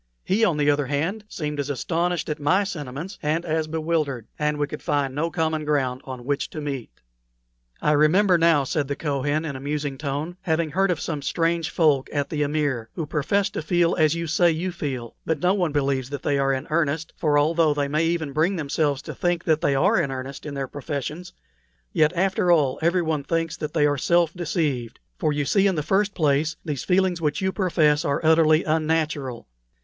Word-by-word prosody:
He, 210 +4 +1
on 175 -9 +3
the 145 0 +3
other 145 -2 0
hand, 165 - -2
seemed 150 -2 -4
as 140 0 -2
astonished 170 +5 -1
at 150 - -3
my 180 +8 +3
sentiments 165 0 -6
and 160 +3 0
as 160 -1 -1
bewildered, 155 -6 -1
and 150 0 0
we 145 - +1
could 150 +1 -8
find 145 -3 0
no 155 +4 -1
common 160 -2 -1
ground 135 -4 0
on 130 -2 -7
which 140 0 -1
to 155 - -7
meet. 140 -5 -4 0.9
"I 150 - +3
remember 175 +6 +4
now," 165 -4 +4
said 140 +1 -1
the 140 - -2
Kohen, 145 +1 -1
in 145 -4 -4
a - - -6
musing 145 -1 -3
tone, 150 +4 -3
"having 160 -2 0
heard 195 +3 +2
of 175 -4 0
some 150 -3 -3
strange 165 +3 0
folk 150 -5 +2
at 145 -2 -2
the 150 -2 -1
Amir, 145 -6 -1
who 160 - -3
profess 155 +7 0
to - - -3
feel 175 +1 +2
as 155 -1 +3
you 170 0 -3
say 170 +2 +3
you 170 +3 -1
feel, 135 -9 -5
but 160 - 0
no 180 +1 +3
one 180 -5 0
believes 135 -3 0
that 140 -1 -6
they 140 -1 +1
are 135 0 +2
in 130 -1 -2
earnest; 155 0 0
for 150 -3 +1
although 155 0 +3
they 145 -1 0
may 155 +3 +1
even 165 -4 -1
bring 165 +7 +2
themselves 145 -2 -1
to - - -6
think 175 -1 -1
that 160 -1 +2
they 140 -4 +2
are 185 +8 +3
in 145 - -2
earnest 135 +2 -6
in 145 - -5
their 135 -1 -3
professions, 145 +5 -5 0.6
yet 155 0 +4
after 185 0 +2
all 145 -6 +3
everyone 165 -3 +1
thinks 165 +2 -1
that 150 -2 -5
they 150 -2 +4
are 145 -1 +1
self 170 +2 +2
deceived. 150 - -2 0.2
For 155 - +1
you 145 -1 -1
see, 200 +6 +3
in 190 - +1
the 150 - -1
first 200 +4 +1
place, 155 0 +1
these 145 -5 -3
feelings 180 -2 +1
which 150 -2 0
you 190 0 0
profess 160 -6 +2
are 140 -4 0
utterly 160 0 +5
unnatural. 155 -5 -1
155 Hz, 210 wpm, -24 LUFS, 145-170 Hz, 0.9 s, utterly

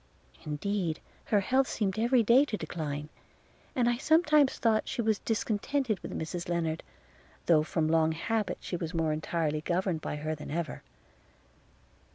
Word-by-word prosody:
Indeed 165 +2 -2 0.3
her 205 -2 +2
health 260 +6 +2
seemed 200 -1 -1
every 240 +1 +4
day 235 +6 +6
to 220 -7 -3
decline: 150 -5 -4 0.7
and 245 -2 +2
I 240 0 +2
sometimes 305 -1 +4
thought 220 -2 +2
she - - -5
was 220 -3 +2
discontented 225 +1 -1
with - - -6
Mrs 170 +2 -4
Lennard, 165 -2 -1 0.6
though 160 -3 +5
from 155 0 0
long 160 0 +3
habit 205 +3 -1
she - - -4
was 170 -1 -4
more 160 -2 +1
entirely 155 -1 -1
governed 175 0 -1
by - - -3
her 155 +1 -3
than 150 -1 -8
ever. 170 +2 -3
180 Hz, 155 wpm, -30 LUFS, 160-225 Hz, 0.7 s, day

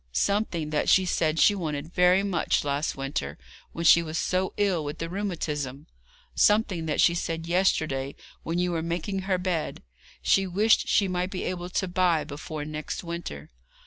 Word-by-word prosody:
'Something 170 - 0
that 150 - +1
she 190 - +5
said 160 -3 0
she 205 - +6
wanted 160 -3 -4
very 180 +2 +4
much 185 -5 0
last 145 +1 -1
winter, 135 - -4 0.3
when 170 - -4
she 170 +1 +8
was 160 -1 -4
so 185 +2 0
ill 195 -6 +1
with 145 0 -5
the 165 - -4
rheumatism 155 -7 -3 0.5
something 205 -6 +2
that 150 - -1
she 170 - +5
said 165 -1 -3
yesterday, 155 -6 0 0.3
when 165 +1 -3
you 180 0 +1
were 165 -1 -1
making 175 +4 -2
her 190 -1 0
bed, 180 -3 -2 0.4
she 195 - +3
wished 210 +5 +3
she 200 - +3
might 180 0 -1
be 190 - -4
able 180 -1 -4
to 190 +1 -1
buy 175 -3 +2
before 150 +1 -6
next 155 +3 -5
winter.' 170 - -6
170 Hz, 175 wpm, -26 LUFS, 155-185 Hz, 0.5 s, she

